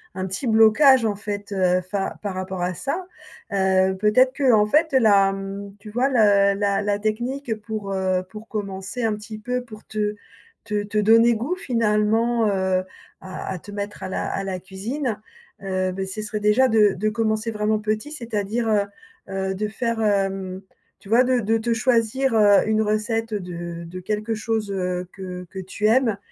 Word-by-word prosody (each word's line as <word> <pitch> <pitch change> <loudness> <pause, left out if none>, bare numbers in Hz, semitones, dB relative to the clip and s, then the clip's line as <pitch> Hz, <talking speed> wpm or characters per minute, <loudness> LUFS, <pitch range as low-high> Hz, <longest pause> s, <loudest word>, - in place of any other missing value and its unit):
un 185 0 -3
petit 190 +8 -4
blocage, 230 +4 +6
en 215 -2 0
fait, 205 0 -5
heu, 185 -2 +2
fa 195 +2 -3
par 205 -2 -3
rapport 185 -1 -4
à 180 +1 -1
ça. 305 - -3 0.5
Heu, 190 -1 +2
peut-être 255 +5 +4
qu'en 240 -7 +4
fait 305 +7 +2
la, 200 -6 +5
mmh, 195 +1 -7
tu 210 - -11
vois 245 +5 +1
le 205 -6 +4
la 200 0 +1
la 205 0 0
technique 240 +3 -2
pour, 215 -2 -5
heu, 185 -1 0
pour 215 +3 -10
commencer 200 +2 -5
un 220 -2 +1
petit 215 +1 -9
peu 250 +3 -2
pour 215 -3 -12
te 210 -1 -2 0.5
te 210 -1 -2
te 210 +1 -1
donner 230 +3 +5
goût, 250 +11 -2
finalement, 230 - +1
heu, 190 -2 +1 0.4
à 190 -1 -7
à 185 - -3
te 205 - -12
mettre 205 0 -6
à 190 - -4
la - - -2
à 195 - -2
la 190 -1 -3
cuisine. 210 - -4 0.5
Heu, 185 -1 -1
beh, 190 0 -3
ce 190 +3 -5
serait 210 0 -4
déjà 210 +5 +4
de 210 -4 +4
de 215 +4 -1
commencer 220 0 -1
vraiment 215 0 0
petit. 215 +7 -2
C'est-à-dire, 225 -3 -2
heu 205 -2 +2 0.5
heu, 190 0 -2
de 210 +2 -2
faire 230 +1 -2
hem, 195 -2 0 0.4
tu - - -16
vois 235 +3 +5
de 255 -1 +2
de 225 0 +1
te 230 +1 0
choisir, 240 +2 +1
heu, 205 -1 +5
une 220 0 +2
recette 220 +1 -1
de 175 -3 -5
de 180 +2 -8
quelque 210 +4 -2
chose, 215 -1 -2
heu, 180 -2 -2
que 180 -2 -7
que 195 - -11
tu 190 +3 -4
aimes 225 -3 +3
210 Hz, 185 wpm, -23 LUFS, 195-225 Hz, 0.5 s, blocage